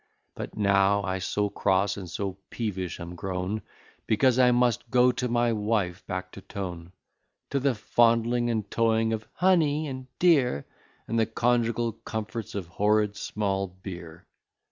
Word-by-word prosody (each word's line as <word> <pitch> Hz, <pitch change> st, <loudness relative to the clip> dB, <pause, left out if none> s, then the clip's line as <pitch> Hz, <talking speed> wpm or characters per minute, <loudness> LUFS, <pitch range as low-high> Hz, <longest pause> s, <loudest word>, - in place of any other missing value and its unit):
But -, -, -7 dB
now 100 Hz, 0 st, +3 dB
I 95 Hz, 0 st, -2 dB
so 105 Hz, +3 st, 0 dB
cross, 100 Hz, 0 st, +1 dB
and 95 Hz, -3 st, -7 dB
so 95 Hz, +2 st, -4 dB
peevish 95 Hz, -6 st, -3 dB
am 85 Hz, +1 st, -7 dB
grown, 95 Hz, +4 st, -3 dB, 0.5 s
Because 125 Hz, +3 st, +3 dB
I 125 Hz, -1 st, +6 dB
must 120 Hz, -1 st, +2 dB
go 125 Hz, +1 st, +5 dB
to 125 Hz, 0 st, -2 dB
my 120 Hz, -1 st, +2 dB
wife 105 Hz, -4 st, -1 dB
back 95 Hz, -1 st, -4 dB
to 95 Hz, -, -10 dB
town; 90 Hz, -3 st, -6 dB, 0.6 s
To 140 Hz, -, +1 dB
the 135 Hz, -1 st, +1 dB
fondling 115 Hz, +2 st, +2 dB
and 110 Hz, -3 st, 0 dB
toying 115 Hz, -1 st, +2 dB
of 110 Hz, 0 st, -4 dB
"honey," 160 Hz, -5 st, +3 dB
and 130 Hz, -2 st, -6 dB
"dear," 140 Hz, -, +3 dB, 0.4 s
And 115 Hz, -, 0 dB
the 110 Hz, -, +2 dB
conjugal 120 Hz, 0 st, +1 dB
comforts 110 Hz, 0 st, -6 dB
of 100 Hz, -3 st, -3 dB
horrid 105 Hz, +4 st, +1 dB
small 100 Hz, -2 st, -1 dB
beer. 90 Hz, -3 st, -10 dB
110 Hz, 150 wpm, -27 LUFS, 95-120 Hz, 0.6 s, I